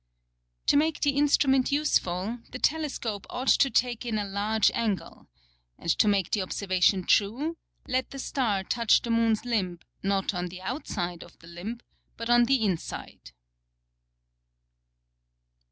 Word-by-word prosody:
To - - +4
make 315 +1 +1
the 290 - +3
Instrument 275 -2 +3
useful, 230 -7 0
the - - -6
Telescope 265 -9 -1
ought 255 +1 -2
to 275 - +5
take 245 -2 0
in 230 -3 -2
a 205 - -1
large 205 +1 +1
Angle: 215 -5 -3 0.5
And 170 - -1
to 215 - +3
make 200 -3 +1
the 210 - +1
Observation 185 0 +1
true, 245 - +1 0.3
let 255 0 -1
the 275 - -9
Star 230 -7 -1
touch 230 +3 +2
the 235 - -2
Moon's 230 -1 +2
Limb, 195 -8 -1 0.2
not 195 0 0
on 180 0 -2
the 180 +1 -9
Outside 180 - -4
of - - -17
the - - -18
Limb, 190 +8 -7 0.4
but 230 +1 -2
on 240 0 +6
the 255 -3 +2
Inside. 180 - -4
225 Hz, 145 wpm, -27 LUFS, 195-255 Hz, 0.5 s, on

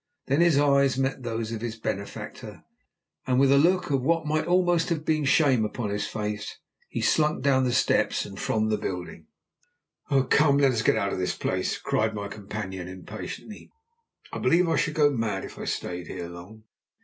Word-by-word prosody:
Then 140 +5 +2
his 170 -4 +4
eyes 140 -2 +3
met 135 0 -1
those 115 -2 -3
of 115 -2 -4
his 115 -1 -4
benefactor, 100 -2 -6 0.6
and 130 0 +2
with 135 0 +5
a 140 - +6
look 180 +1 +2
of 135 -2 +2
what 165 +4 +1
might 155 +2 0
almost 175 -1 +2
have 155 -3 -2
been 155 -2 +1
shame 135 -4 +4
upon 105 0 -3
his 105 0 -2
face, 105 -1 -4 0.3
he - - -3
slunk 150 -4 +2
down 130 -2 +3
the 125 - +1
steps 125 - +2
and 100 -1 -9
from 110 0 0
the 105 - 0
building. 90 -2 -6 1.0
"Come, 145 -2 +5
let 140 -2 +4
us 115 -3 0
get - - +3
out 100 0 -1
of - - -3
this 90 - -1
place," - - -1
cried 110 0 -1
my 100 -1 -4
companion 100 -3 -6
impatiently, 105 - -8 0.6
"I - - -3
believe 175 +1 +3
I 165 - +1
should 155 - 0
go 145 -2 +4
mad 115 -6 -2
if - - -11
I - - -5
stayed 90 -1 -4
here 85 - -6
long." 90 +6 -12
125 Hz, 190 wpm, -26 LUFS, 105-150 Hz, 1.0 s, a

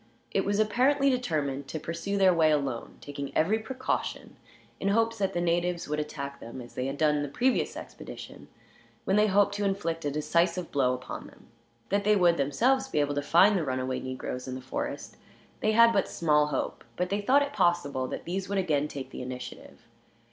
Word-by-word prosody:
It - - +1
was 200 0 +1
apparently 260 +6 +3
determined 150 - -1
to 160 - -4
pursue 170 +6 -3
their 190 -2 +5
way 160 -2 +4
alone, 140 -6 -1
taking 140 -1 -6
every 205 +8 +3
precaution, 260 +4 -3 0.4
in 195 - -2
hopes 225 +2 +2
that 195 -2 0
the 175 - -1
natives 175 0 0
would 150 +1 -1
attack 140 -2 -5
them 115 +3 -8
as 120 -1 -10
they 125 - -2
had 135 +1 -4
done 150 -1 +2
the 145 - -2
previous 255 - +1
expedition; - - -10 0.6
when 190 - +2
they 210 +1 +5
hoped 200 0 +3
to 205 - -1
inflict 180 -5 -1
a 145 - 0
decisive 170 +4 0
blow 125 -3 +2
upon 125 - -7
them. - - -19 0.4
That 200 +1 +1
they 210 +1 +4
would, 175 -3 +4
themselves, 250 - +2
be 265 - -4
able 145 0 +1
to 145 - -1
find 175 +8 +5
the 180 - +1
run 130 -3 -1
away 130 0 -2
negroes 130 0 -5
in 130 - -4
the - - -5
forest 130 +1 -5 0.4
they 215 - +1
had 230 +1 +7
but 195 - +2
small 150 -3 +2
hope; 145 -3 -3
but 180 +1 -2
they 205 +1 0
thought 270 +7 +4
it 285 0 -5
possible 145 - +1
that - - -6
these 185 +2 -3
would 200 - -1
again 150 -6 +1
take 135 -3 -7
the - - -7
initiative. 125 0 -8
170 Hz, 205 wpm, -28 LUFS, 140-205 Hz, 0.6 s, had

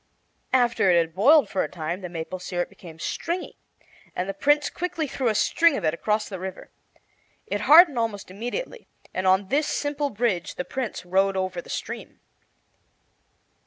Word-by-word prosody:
After 240 -6 +3
it 175 - +5
had 165 -1 +1
boiled 265 - +5
for 195 - -1
a - - -4
time 170 +2 -4
the 180 - -6
maple 170 +2 -5
syrup 175 -1 -3
became 165 -3 -13
stringy, 340 - -4 0.6
and 180 - -2
the 195 - -3
Prince 290 +4 +2
quickly 340 -2 -3
threw 265 -2 -2
a 220 - +2
string 335 +6 +3
of 200 - -5
it 155 - +2
across 210 +5 -1
the 190 -3 -7
river. 190 0 -7 0.7
It - - -3
hardened 310 -4 +7
almost 210 -5 -3
immediately, 245 - -5 0.3
and 185 0 -1
on 190 +1 +3
this 295 +4 +1
simple 290 0 -1
bridge 210 -6 -1
the 180 - -4
Prince 245 -8 -4
rode 190 +2 +2
over 185 -2 -2
the - - -17
stream. - - -6
200 Hz, 170 wpm, -25 LUFS, 185-280 Hz, 0.7 s, hardened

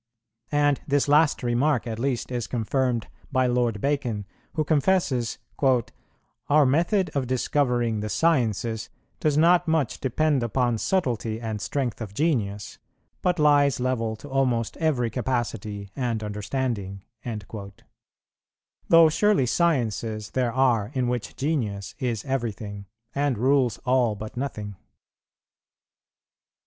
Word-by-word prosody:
And 145 -1 +2
this 145 -1 +2
last 150 -1 +4
remark 125 +3 +1
at 115 -2 -4
least 130 -1 -1
is 120 -2 -2
confirmed 120 0 0 0.3
by 130 -2 +2
Lord 120 -3 +1
Bacon, 120 -6 -1 0.3
who 155 - 0
confesses 145 -6 +1 1.1
"Our 150 0 +5
method 170 +6 +2
of 135 -3 -1
discovering 125 -3 +1
the 105 +1 -3
sciences 115 - +1 0.3
does 150 -2 +1
not 175 +2 +4
much 160 -6 0
depend 145 +2 +1
upon 120 0 0
subtlety 115 - -1
and 110 -3 -4
strength 125 -5 -2
of 100 -3 -6
genius, 105 -10 -1 0.4
but 180 -1 +1
lies 145 -4 +4
level 120 -3 -1
to 110 +7 -12
almost 130 -4 0
every 130 -8 +1
capacity 110 -5 -3
and 120 -4 -2
understanding;"[113:1] 105 -2 -5 1.1
though 165 -1 +8
surely 190 -1 +3
sciences 115 -8 0
there 125 -2 0
are, 120 -5 +2
in 125 -2 +1
which 120 -1 -3
genius 115 -10 -2
is 120 -4 -2
everything, 110 -6 -4 0.3
and 140 -3 0
rules 130 -2 +2
all 125 -4 +2
but 110 +3 -8
nothing. 105 -7 -4
125 Hz, 120 wpm, -25 LUFS, 110-145 Hz, 1.1 s, though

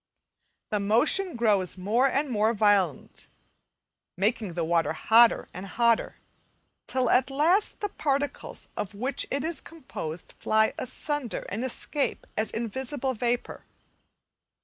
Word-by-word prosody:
The 210 - +1
motion 285 - +2
grows 205 -6 +1
more 220 +8 +2
and 280 +2 0
more 225 -2 +1
violent, 200 -8 +1 0.9
making 210 -2 0
the 170 - -1
water 165 0 +1
hotter 230 +1 +4
and 185 +2 -7
hotter, 235 +3 +1 0.7
till 255 -1 +1
at 255 +1 +4
last 325 +9 +2
the 415 - -1
particles 285 -4 -2
of 205 0 -4
which 255 +6 0
it 275 0 -1
is 325 -2 -2
composed 180 - -8
fly 220 0 +2
asunder, 275 0 -3
and 220 +5 -3
escape 270 +3 -1
as 220 +1 -1
invisible 260 +4 -3
vapour. 240 +1 -2
235 Hz, 125 wpm, -27 LUFS, 205-275 Hz, 0.9 s, hotter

